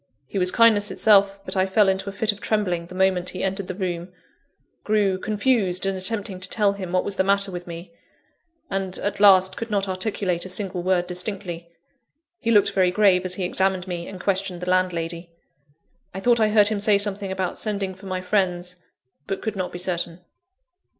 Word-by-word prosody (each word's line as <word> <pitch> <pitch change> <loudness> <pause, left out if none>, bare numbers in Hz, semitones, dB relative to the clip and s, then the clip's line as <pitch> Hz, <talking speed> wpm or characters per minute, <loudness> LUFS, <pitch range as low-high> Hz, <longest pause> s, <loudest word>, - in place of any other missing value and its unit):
He 170 +9 -4
was 180 0 +3
kindness 215 -1 +4
itself; 200 -2 +3
but - - -4
I 190 0 +2
fell 205 +1 +3
into 190 +1 0
a - - -5
fit 210 +2 0
of 205 - -12
trembling, 180 -6 -1
the 185 - -11
moment 185 -1 +2
he 185 - -5
entered 195 0 -2
the 185 - -5
room 180 -2 -4 0.7
grew 205 -3 +1
confused 205 -3 0
in 195 0 0
attempting 195 0 -1
to 185 0 -4
tell 210 -2 +2
him 190 -3 -7
what 185 0 +1
was 200 - -3
the - - +3
matter 200 0 +2
with 175 -1 -7
me 170 +4 -9 0.8
and, 190 -1 -3
at 205 - -3
last, 190 -2 +6
could 230 - -6
not 200 -2 0
articulate 185 -2 -2
a 185 - -7
single 185 -1 -1
word 180 0 +1
distinctly. 180 -2 -4 0.7
He 230 - -3
looked 205 -3 +4
very 190 -2 +2
grave 185 -1 +3
as 185 0 +1
he 190 - -3
examined 190 0 +1
me 175 -2 -5
and 190 - -9
questioned 190 -2 -1
the 180 0 -2
landlady. 170 -2 -1 0.9
I - - -3
thought 235 +3 +3
I 215 -1 +3
heard 210 -1 +5
him 215 -2 -1
say 205 0 +4
something 200 -1 -1
about 190 -2 -3
sending 200 -3 -2
for 190 +1 -13
my 185 -1 -3
friends, 180 -2 -1 0.5
but 195 -1 -4
could 220 -1 -3
not 185 -2 -3
be - - -6
certain. 175 -1 -2
190 Hz, 200 wpm, -23 LUFS, 180-205 Hz, 0.9 s, last